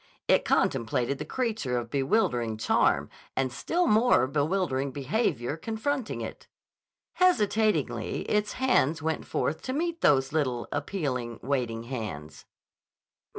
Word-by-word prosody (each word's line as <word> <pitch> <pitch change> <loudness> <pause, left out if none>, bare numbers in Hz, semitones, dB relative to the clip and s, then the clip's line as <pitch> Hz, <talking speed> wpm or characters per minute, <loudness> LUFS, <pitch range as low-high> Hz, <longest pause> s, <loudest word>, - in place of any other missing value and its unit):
It - - +4
contemplated 120 +4 +1
the - - -4
creature 220 - -1
of 115 -1 -4
bewildering 135 - +1
charm 110 - +2 0.3
and 130 -1 0
still 350 - 0
more 220 - +4
bewildering 145 -1 0
behavior 140 - -1
confronting 225 - -2
it. - - -7 0.7
Hesitatingly 220 - +2
its 210 0 0
hands 165 - +2
went 160 0 -2
forth 160 - -1
to 255 - -4
meet 335 +3 -2
those 135 -1 +3
little, 130 -6 0
appealing, 140 - -3
waiting 120 -4 -1
hands. 105 - -6
145 Hz, 115 wpm, -28 LUFS, -, 0.7 s, It